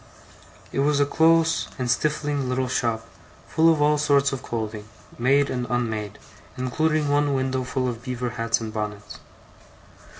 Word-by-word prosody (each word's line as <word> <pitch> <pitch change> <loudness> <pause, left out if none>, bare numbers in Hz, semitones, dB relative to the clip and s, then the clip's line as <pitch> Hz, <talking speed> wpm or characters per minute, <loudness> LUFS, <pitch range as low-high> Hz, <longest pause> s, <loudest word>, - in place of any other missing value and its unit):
It - - -2
was 145 +1 +2
a 145 - +4
close 165 +2 +3
and 125 - -2
stifling 145 +1 0
little 130 0 0
shop; 115 -3 -1 0.4
full 165 +1 +4
of 150 -2 +2
all 150 0 +3
sorts 140 -1 +3
of 135 - -4
clothing, 110 -2 -5 0.3
made 140 +4 +3
and 125 -1 -2
unmade, 110 -4 -2 0.4
including 155 +4 0
one 145 0 +2
window 130 -1 -1
full 130 0 -2
of 120 -2 -4
beaver 125 -1 -3
hats 115 0 0
and 110 -2 -6
bonnets. 105 -1 -5
130 Hz, 155 wpm, -24 LUFS, 115-145 Hz, 0.4 s, a